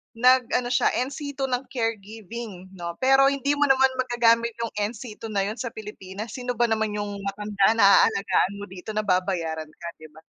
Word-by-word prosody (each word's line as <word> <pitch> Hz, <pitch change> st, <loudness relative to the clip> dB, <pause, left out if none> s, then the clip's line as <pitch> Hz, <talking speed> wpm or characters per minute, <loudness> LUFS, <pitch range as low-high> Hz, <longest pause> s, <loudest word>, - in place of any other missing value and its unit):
nag-ano 250 Hz, 0 st, +3 dB
siya 245 Hz, -, +3 dB, 0.2 s
NC 285 Hz, +1 st, -6 dB
II 270 Hz, -2 st, -2 dB
ng 250 Hz, +1 st, -2 dB
caregiving 220 Hz, -4 st, -5 dB
'no, 170 Hz, -2 st, -6 dB
pero 270 Hz, +3 st, +5 dB
hindi 280 Hz, 0 st, 0 dB
mo 290 Hz, -, +4 dB
naman 265 Hz, 0 st, +4 dB
magagamit 235 Hz, -2 st, +2 dB
yung 230 Hz, -, -3 dB
NC 210 Hz, +2 st, -5 dB
II 225 Hz, -, -6 dB
na 195 Hz, -, +2 dB
yun 215 Hz, +4 st, -4 dB
sa 250 Hz, -, -3 dB
Pilipinas, 210 Hz, -1 st, -8 dB
sino 245 Hz, 0 st, -4 dB
ba 240 Hz, -, +2 dB
naman 220 Hz, -1 st, 0 dB
yung 205 Hz, -1 st, -4 dB
matanda 200 Hz, +1 st, +1 dB
na 200 Hz, -3 st, +6 dB
aalagaan 195 Hz, 0 st, 0 dB
mo 200 Hz, -, -7 dB
dito 190 Hz, +3 st, -8 dB
na 215 Hz, -, 0 dB
babayaran 180 Hz, -5 st, -1 dB
ka 165 Hz, +2 st, -11 dB
'di 155 Hz, -, -11 dB
ba. 160 Hz, -, -15 dB
220 Hz, 190 wpm, -25 LUFS, 195-245 Hz, 0.2 s, na